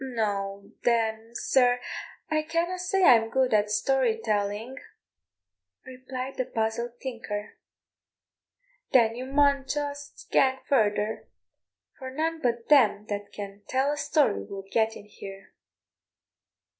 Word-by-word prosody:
"No, 200 -5 -3
then, 225 -1 +1
sir, 250 -1 +3 0.5
I 310 0 +1
canna 335 +3 -1
say 370 +1 +1
I'm 225 -7 +6
good 260 0 +1
at 210 -1 +3
story 240 +1 +2
telling," 215 +3 -2 1.1
replied 255 0 -6
the 255 - 0
puzzled 235 +2 -2
tinker. 225 -5 -6 1.3
"Then 230 -3 +5
you 255 +2 -5
maun 280 0 +3
just 285 0 -5
gang 265 -1 +4
further, 215 -4 +1 0.7
for 260 - -6
none 320 +4 -2
but 235 -1 -1
them 220 -8 +5
that 205 0 -4
can 200 0 -8
tell 265 +2 +1
a - - -1
story 285 - +2
will 195 - -8
get 225 0 +2
in - - -11
here." 195 -2 -11
240 Hz, 120 wpm, -27 LUFS, 210-270 Hz, 1.3 s, I'm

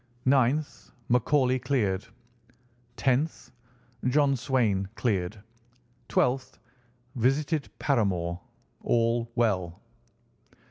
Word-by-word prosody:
"9th. 135 +3 +1 0.2
McCauley 130 +1 +2
cleared. 105 -9 0 0.9
"10th. 130 -1 0 0.5
John 140 +2 +3
Swain 115 -7 0
cleared. 100 -3 -1 0.7
"12th. 130 +1 0 0.6
Visited 140 +5 0
Paramore. 90 - 0 0.4
All 115 0 +1
well." 95 -8 0
125 Hz, 65 wpm, -27 LUFS, 105-135 Hz, 0.9 s, John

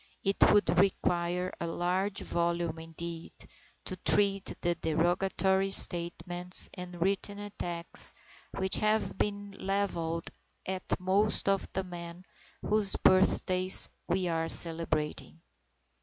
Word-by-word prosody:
It 195 0 -1
would 205 -4 +2
require 180 -1 -1
a 170 - -3
large 185 +4 -3
volume 170 -1 -3
indeed, 165 +1 -8 0.5
to 185 - -6
treat 195 +1 +4
of - - -9
the 175 - 0
derogatory 190 +4 -1
statements 175 0 +4
and 180 -2 -9
written 200 +3 -1
attacks 175 -4 -3 0.5
which 190 0 0
have 215 +1 -1
been 205 -1 -3
levelled 175 -4 -3 0.3
at 190 0 -4
most 195 +4 -1
of 195 -1 -1
the 190 - -3
men 175 0 -10 0.4
whose 210 -2 +2
birthdays 185 0 +3 0.2
we 185 -1 -1
are 165 -1 -2
celebrating. 165 -1 +3
180 Hz, 110 wpm, -28 LUFS, 170-195 Hz, 0.5 s, treat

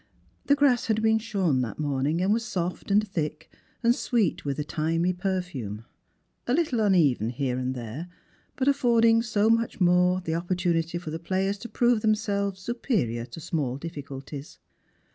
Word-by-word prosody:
The 285 - +5
grass 270 -4 +3
had 220 -2 +2
iDeen 220 0 +2
snorn 190 - 0
that 115 -5 -4
morning, 145 +2 0
and 195 +3 +3
was 230 +1 0
soft 185 -7 -3
and 210 +2 +3
thick, 155 -4 -4 0.3
and 235 +1 +5
sweet 230 -7 0
with 140 -2 -2
a 150 - -1
thymy 165 +4 0
perfume: 175 - -3 0.6
a 245 - +2
little 300 -8 +1
uneven 160 - +3
here 125 0 -2
and 130 +1 -2
there, 125 +8 -6 0.5
but 270 -2 -1
affording 230 -4 +4
so 220 -2 +1
much 230 0 +2
the 190 - +1
more 180 +1 +4
opportunity 170 -1 0
for 170 -3 -6
the 160 - -4
players 190 +3 -1
to 235 - -8
prove 240 0 +2
themselves 200 -3 0
superior 185 - -1
to 120 - -9
small 150 -6 -2
difficulties. 140 -2 -8
180 Hz, 160 wpm, -26 LUFS, 150-220 Hz, 0.6 s, The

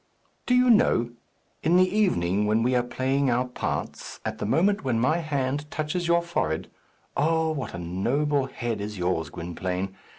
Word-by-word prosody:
"Do 250 - +4
you 250 0 +5
know! 165 - +3 0.5
In 165 +2 +3
the 185 0 +5
evening, 105 - +1
when 110 +2 +2
we 125 +2 +2
are 125 - +3
playing 130 +3 0
our 125 +1 +2
parts, 125 - -4
at - - -3
the - - -2
moment 190 - +2
when 125 -4 0
my 155 +8 +2
hand 145 -2 -2
touches 155 +4 -2
your 170 0 +3
forehead 80 - -2 0.4
oh, 160 +1 +2
what 140 - -4
a - - -5
noble 130 - 0
head 120 -5 -4
is 105 0 -5
yours, 90 -3 -1
Gwynplaine! 90 +3 -4
130 Hz, 170 wpm, -26 LUFS, 105-160 Hz, 0.5 s, you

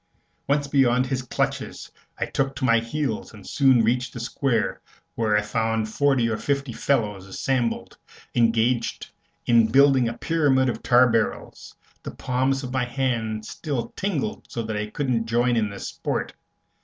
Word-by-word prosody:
Once 145 0 +1
beyond 130 -3 +3
his 130 0 -2
clutches, 125 - -3 0.3
I - - -1
took 135 0 -2
to 130 0 -2
my 115 -2 +4
heels 115 -1 -3
and 100 - -13
soon 130 -4 +4
reached 125 +3 0
the 120 - -6
Square, 120 +1 -1 0.3
where 110 -2 +1
I 105 - +1
found 110 0 -1
forty 135 -1 +2
or 110 -1 -1
fifty 140 -1 -2
fellows 105 -8 -1
assembled, 120 +4 -2 0.3
engaged 115 +1 +1 0.3
in 115 -2 +5
building 135 0 +4
a 115 - -7
pyramid 140 -5 +2
of - - -4
tar 125 +1 +5
barrels. 115 -2 -2 0.3
The - - -6
palms 130 +2 0
of 125 0 -5
my 130 -2 +1
hands 115 -4 -2
still 140 -7 -4
tingled 190 -8 -3
so 115 - -4
that 110 -1 -4
I 105 0 -2
couldn't 120 -2 -1
join 120 +1 +2
in 110 -2 +1
the 100 - -8
sport. - - -3
120 Hz, 160 wpm, -24 LUFS, 115-135 Hz, 0.3 s, in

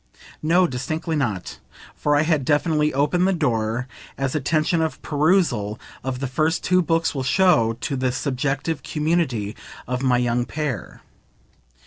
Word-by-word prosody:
No, 175 +4 +4
distinctly 155 +4 -3
not; 110 -11 -2 0.4
for 145 0 +1
I 145 - +4
had 155 -3 +1
definitely 150 +1 +2
opened 150 +7 +2
the 195 - +2
door, 120 -6 0 0.3
as 135 -1 -1
attention 155 +3 +1
of 160 -1 -2
perusal 145 - +1 0.2
of 130 0 -3
the - - -1
first 155 +6 0
two 180 0 +3
Books 165 -1 +1
will 135 - -2
show, 130 -6 +3
to 140 - -2
the 130 -1 0
subjective 135 +3 -2
community 150 -10 -1 0.3
of 125 +1 -2
my 130 -2 +3
young 120 0 +1
pair. 145 - -4
145 Hz, 145 wpm, -23 LUFS, 125-160 Hz, 0.4 s, No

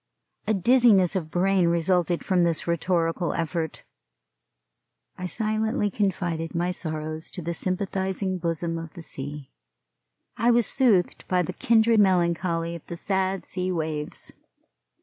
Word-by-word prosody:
A 215 - +2
dizziness 210 -3 +4
of 165 -5 -2
brain 185 +1 +2
resulted 170 +1 +1
from 185 -3 +2
this 170 -2 +1
rhetorical 170 0 0
effort. 165 -1 -3 1.3
I 180 - -5
silently 215 0 0
confided 175 -5 -2
my 175 +1 0
sorrows 155 -2 -4
to 180 - -6
the 170 +2 -2
sympathizing 190 +1 -1
bosom 165 0 -2
of 165 -2 -9
the 170 - -8
sea. 145 -1 -7 0.9
I 235 +2 +2
was 240 -1 +4
soothed 220 -10 +2
by 180 -1 +2
the - - -5
kindred 230 -3 +3
melancholy 170 -3 +1
of 170 - -8
the 170 - -6
sad 190 0 -1
sea 185 0 -1
waves. 155 -3 -4
180 Hz, 130 wpm, -25 LUFS, 165-195 Hz, 1.3 s, dizziness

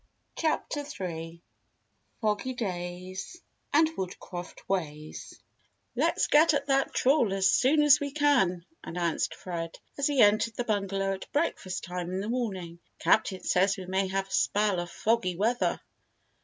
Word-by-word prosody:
CHAPTER 305 -2 -1
THREE 170 - -6 0.8
FOGGY 215 +4 0
DAYS 185 - -5 0.3
AND 315 +2 +5
WOODCRAFT 180 -1 -7
WAYS 155 -5 -4 0.6
"Let's - - +2
get 305 +1 +5
at 280 -1 -1
that 275 -1 +2
trawl 255 -5 +3
as 195 -1 +3
soon 295 +4 +4
as 290 -3 +7
we 285 - -2
can," 260 - +2 0.2
announced 170 -1 -1
Fred, 165 -2 -5 0.2
as 280 - +2
he 290 -2 0
entered 215 +2 +3
the 245 - -1
bungalow 195 -3 -1
at 190 - -8
breakfast 250 - -1
time 180 -1 -4
in 185 +1 -2
the 205 +3 -3
morning. 190 -9 -3 0.2
"Captain 190 -3 +2
says 195 +2 +2
we 190 - -7
may 190 +1 0
have 195 +1 -2
a - - -18
spell 205 -3 +2
of 175 0 -4
foggy 210 -5 0
weather." 225 +7 +1
195 Hz, 145 wpm, -28 LUFS, 180-255 Hz, 0.8 s, as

